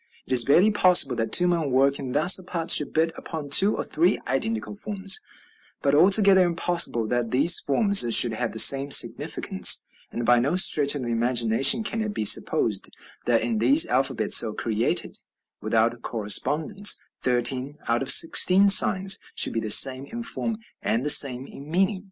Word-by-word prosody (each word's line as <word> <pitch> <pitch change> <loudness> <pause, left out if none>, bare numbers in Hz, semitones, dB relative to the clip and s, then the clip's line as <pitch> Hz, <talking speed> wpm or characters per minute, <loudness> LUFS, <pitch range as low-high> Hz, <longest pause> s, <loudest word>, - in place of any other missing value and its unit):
It - - -7
is 120 -2 +3
barely 175 - +1
possible 180 -10 +2
that 115 -1 -5
two 180 - +2
men 170 -4 -3
working 135 0 -3
thus 165 +6 +3
apart 175 -3 -5
should 150 - +1
hit 165 +1 -1
upon 150 -4 -10
two 200 +8 +2
or - - -6
three 175 +5 -2
identical 220 - -6
forms, 200 -2 -3 0.6
but 140 - -2
altogether 190 +4 +2
impossible 170 -8 -1
that 120 -2 -4
these 145 +8 +3
forms 200 - +1
should 120 -2 +3
have 115 0 -6
the 110 - -11
same 135 +4 +4
significance; - - +1 0.3
and 120 - -7
by 120 +1 +1
no 140 +8 -3
stretch 150 -6 +4
of 140 - -7
the 120 - -7
imagination 120 - +1
can 225 +1 -6
it 215 -1 -7
be 110 - -5
supposed - - +1 0.4
that 120 -2 -1
in 115 -2 -5
these 135 +8 +3
alphabets 130 +2 0
so 110 -2 +1
created, 110 0 -5 0.4
without 115 +2 -3
correspondence, 145 - -1 0.2
thirteen 130 +3 -2
out 115 0 -3
of 135 - -3
sixteen 185 +7 +4
signs 195 0 +3 0.2
should - - +1
be 115 - -4
the 110 - -8
same 130 +5 +4
in 235 +6 -10
form 230 -1 -6 0.2
and 120 +5 -4
the 150 - +5
same 130 -3 +3
in 140 +1 -15
meaning. 190 +3 -3
140 Hz, 175 wpm, -21 LUFS, 120-185 Hz, 0.6 s, the